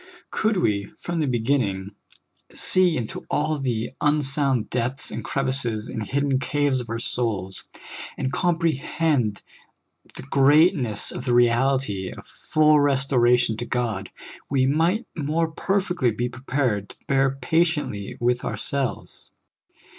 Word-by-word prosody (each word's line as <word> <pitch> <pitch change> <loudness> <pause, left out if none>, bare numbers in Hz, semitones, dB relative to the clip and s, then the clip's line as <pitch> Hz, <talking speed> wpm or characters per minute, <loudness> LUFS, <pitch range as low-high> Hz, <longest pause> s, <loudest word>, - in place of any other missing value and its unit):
Could 220 -2 +1
we, 100 - +1
from 170 -1 -4
the 150 - 0
beginning, 115 -6 0 0.6
see 180 -3 +3
into 115 -3 -5
all 155 0 0
the 120 -4 -2
unsounded 140 -5 +1
depths 130 +3 -2
and - - -5
crevices 130 -5 -1
and 115 - -4
hidden 140 +3 0
caves 145 0 0
of 120 - -10
our 115 - -2
souls, 110 -6 -1 0.5
and 130 - -2
comprehend 160 - 0 0.7
the - - -8
greatness 140 - +3
of 125 - -6
the 120 -2 +2
reality 120 -5 +2
of - - -11
full 155 -1 +2
restoration 125 -5 +2
to 120 - -4
God, 110 -6 -2 0.4
we 135 -2 +2
might 165 - +1
more 160 +1 -1
perfectly 185 -6 0
be 120 +2 -2
prepared 125 -5 -2
to - - -13
bear 135 0 +2
patiently 145 - 0
with 120 +1 +1
ourselves. 140 -3 -3
135 Hz, 125 wpm, -24 LUFS, 120-150 Hz, 0.7 s, see